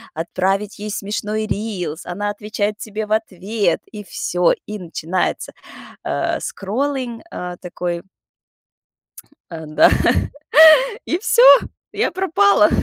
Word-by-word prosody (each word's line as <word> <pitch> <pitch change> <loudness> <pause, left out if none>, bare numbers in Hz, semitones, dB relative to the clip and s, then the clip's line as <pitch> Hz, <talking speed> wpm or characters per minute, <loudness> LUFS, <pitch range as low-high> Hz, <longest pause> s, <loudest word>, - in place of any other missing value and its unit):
отправить 190 +5 -2
ей 210 +1 -5
смешной 210 +2 -3
рилс, 195 -7 -4
она 205 +4 -3
отвечает 210 0 -3
тебе 215 0 -5
в 210 - -14
ответ. 215 -1 -1
И 210 -1 -7
всё, 180 -1 0
и 210 0 -6
начинается, 175 0 -3 0.5
а, - - -1
скроллинг, 245 +3 -3
а, 180 - -6
такой. 175 -1 -4 1.5
Э, 160 -2 -8
да, 155 0 +4 1.2
и 340 - 0
всё, 470 +4 +3 0.5
я - - 0
пропала. 210 - +3
205 Hz, 110 wpm, -19 LUFS, 180-215 Hz, 1.5 s, да